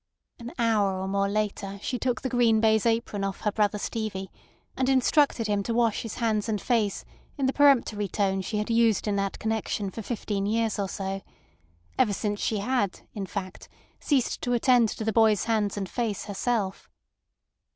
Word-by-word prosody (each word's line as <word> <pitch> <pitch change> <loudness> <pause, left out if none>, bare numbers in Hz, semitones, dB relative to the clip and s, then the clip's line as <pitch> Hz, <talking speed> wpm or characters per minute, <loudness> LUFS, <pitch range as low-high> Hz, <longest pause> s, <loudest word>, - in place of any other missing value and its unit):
An 240 0 -7
hour 210 -5 +2
or 190 - -3
more 200 0 0
later 200 -1 -2
she 250 - -2
took 250 -1 -1
the 260 - -1
green 235 -3 +3
baize 220 0 +3
apron 225 -3 0
off 195 -1 -3
her 210 - +1
brother 210 0 +1
Stevie, 205 -3 -4 0.4
and 260 0 0
instructed 265 -2 +3
him 205 -1 +1
to 230 +3 -2
wash 230 -3 +2
his 225 - -6
hands 220 -2 0
and 210 -2 0
face 220 -4 0 0.3
in 275 - 0
the 265 - +1
peremptory 245 -8 +3
tone 195 0 0
she 210 +3 -3
had 210 +2 -2
used 230 -2 +3
in 205 - +1
that 195 0 -1
connection 220 -2 -2
for 225 - -6
fifteen 205 -3 -3
years 225 0 0
or 195 -1 -1
so—ever 140 - -4
since 205 0 -2
she 220 - 0
had, 205 -2 -1
in 200 -2 -5
fact, 185 -2 -6 0.3
ceased 275 -5 0
to 245 - -1
attend 240 -1 +4
to 220 - -5
the 220 0 0
boy's 220 -2 +4
hands 215 -3 0
and 195 -2 -2
face 225 -1 -2
herself. 205 -1 -2
215 Hz, 180 wpm, -27 LUFS, 200-235 Hz, 0.4 s, attend